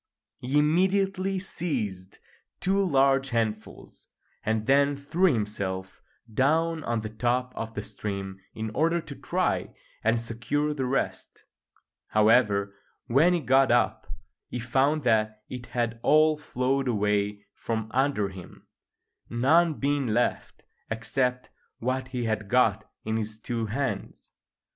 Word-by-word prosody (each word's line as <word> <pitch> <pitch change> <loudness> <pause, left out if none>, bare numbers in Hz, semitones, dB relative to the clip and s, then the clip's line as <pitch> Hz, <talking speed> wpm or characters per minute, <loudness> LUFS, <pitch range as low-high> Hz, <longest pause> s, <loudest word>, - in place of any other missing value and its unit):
He 130 +4 0
immediately 190 +5 +2
seized 115 - -4 0.4
two 195 +2 +2
large 135 -4 +3
handfuls, 110 -2 -4 0.4
and 110 0 0
then 140 +2 +3
threw 170 +6 +2
himself 100 -5 -3 0.3
down 160 +6 +2
on 115 -1 -1
the 110 - -5
top 125 +3 -1
of 115 0 -5
the 105 - -3
stream 100 -2 -5 0.2
in 110 0 -4
order 165 +8 +2
to 150 - -8
try - - -1 0.3
and 115 +1 +3
secure 120 +6 -2
the 135 -3 -2
rest. 135 +2 -3 0.6
However, 105 -2 +3 0.3
when 150 +9 +4
he 170 - -1
got 130 0 +4
up 120 +1 +1 0.4
he - - -5
found 135 +5 +1
that 110 -2 +1
it 125 -1 -7
had 115 -1 -2
all 155 +3 +5
flowed 135 -2 -1
away 105 -2 0
from 110 -1 -3
under 130 -6 +1
him, 95 -2 -12 0.6
none 155 +7 +3
being 140 -1 0
left 115 +2 -1 0.3
except 125 +3 -1 0.3
what 130 +2 -2
he 125 -2 -3
had 110 -2 -2
got 110 -3 +2 0.2
in 110 +1 0
his 110 0 -4
two 115 -1 -3
hands. 135 +5 -4
125 Hz, 130 wpm, -27 LUFS, 110-145 Hz, 0.6 s, all